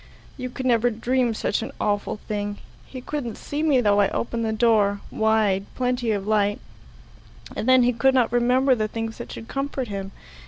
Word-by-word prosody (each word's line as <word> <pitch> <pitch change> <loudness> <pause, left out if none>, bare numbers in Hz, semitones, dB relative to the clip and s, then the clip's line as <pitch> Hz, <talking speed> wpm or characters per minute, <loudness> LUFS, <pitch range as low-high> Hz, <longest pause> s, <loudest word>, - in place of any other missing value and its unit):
You 255 -1 -5
could 260 +1 -6
never 240 -1 +3
dream 240 +1 0
such 210 - -1
an 225 - -5
awful 205 0 -1
thing. 205 -1 -3 0.3
He 255 - -8
couldn't 250 -4 -4
see 290 +1 -4
me 290 -5 +3
though 205 -2 +3
I 200 -1 +4
opened 235 0 -2
the 220 - 0
door 215 -3 +3
wide 215 -3 +1
plenty 250 -2 -1
of 200 -3 -1
light; 205 -1 +1 1.0
and 245 - -2
then 255 -1 +6
he 245 +1 +3
could 265 +3 +3
not 240 -3 +2
remember 250 +2 +3
the 215 -3 0
things 225 +1 -5
that 240 - -7
should 225 - -8
comfort 275 -3 -3
him. 195 -1 -5
230 Hz, 190 wpm, -24 LUFS, 210-255 Hz, 1.0 s, then